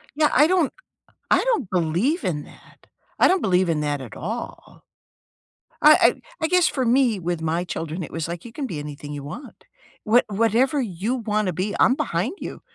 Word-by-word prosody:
Yeah. 300 0 +3
I 295 - +6
don't 355 -4 +2 0.6
I - - +4
don't 455 - 0
believe 185 - 0
in 150 -4 -2
that. - - -19 0.3
I - - +6
don't 375 0 +2
believe 185 -2 +2
in 160 -2 0
that 145 -1 -1
at 130 -4 -9
all. 225 +8 -7 1.0
I - - +8
I - - +4 0.2
I - - +3
guess 360 0 +3
for 260 -3 -1
me, 240 -3 +3
with 175 -1 -3
my 165 +2 -1
children, 165 0 -5
it - - -9
was 165 -1 -3
like 170 +4 -6
you 230 - -9
can 275 -1 -4
be 155 -8 -5
anything 145 0 -8
you 145 -1 -6
want. 180 - -10 0.4
What 235 +3 +4
whatever 230 +7 +1
you 210 +3 -2
wanna 210 -5 -1
be, 190 +5 -2
I'm 255 - +5
behind 195 - -2
you. - - -7
200 Hz, 195 wpm, -23 LUFS, 165-260 Hz, 1.0 s, I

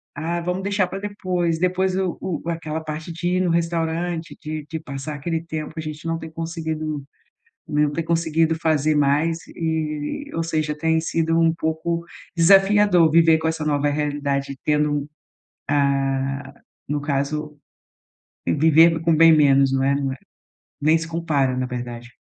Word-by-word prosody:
"Ah, 165 +3 -2
vamos 180 +2 -2
deixar 200 -2 +1
pra 190 - -6
depois.". 180 -5 -2
Depois 185 +1 +1
o 190 -2 -1
o 170 -2 -4
aquela 160 -1 -3
parte 155 +2 -6
de 175 +1 -4
ir - - +1
no 180 - +1
restaurante 165 0 -1
de 155 -2 -5
de 160 - -3
passar 150 0 -6
aquele 160 +3 -3
tempo, 155 -1 -5
a - - -2
gente 155 +1 -7
não 165 0 0
ter 160 0 -8
conseguido, 160 -3 -4 0.7
né, 150 -1 +2
não 145 - -1
tem 165 - -2
conseguido 165 -1 +1
fazer 155 -1 +2
mais, 145 +3 +2
eh, 160 - -3
ou 165 - 0
seja, 155 -2 -1
tem 160 +1 +1
sido 165 0 0
um 165 -1 +4
pouco 165 +1 -2 0.3
desafiador 195 -1 +5
viver 165 0 +5
com 160 - -1
essa 160 -1 -2
nova 145 -1 +1
realidade 145 -2 -2
tendo, 150 -1 +1 0.6
ah, 135 -1 0 0.4
no 145 +1 -1
caso, 150 +1 -2 0.9
vivendo 160 +2 +5
com 165 0 +2
bem 165 +1 +7
menos, 140 -2 +4
não 135 0 +1
é 140 +1 +2
não 140 -1 -1
é, - - -6 0.6
nem 155 +3 +4
se 165 - -5
compara, 150 -6 0
na 130 - -1
verdade. 120 -1 -6
160 Hz, 160 wpm, -22 LUFS, 145-165 Hz, 0.9 s, bem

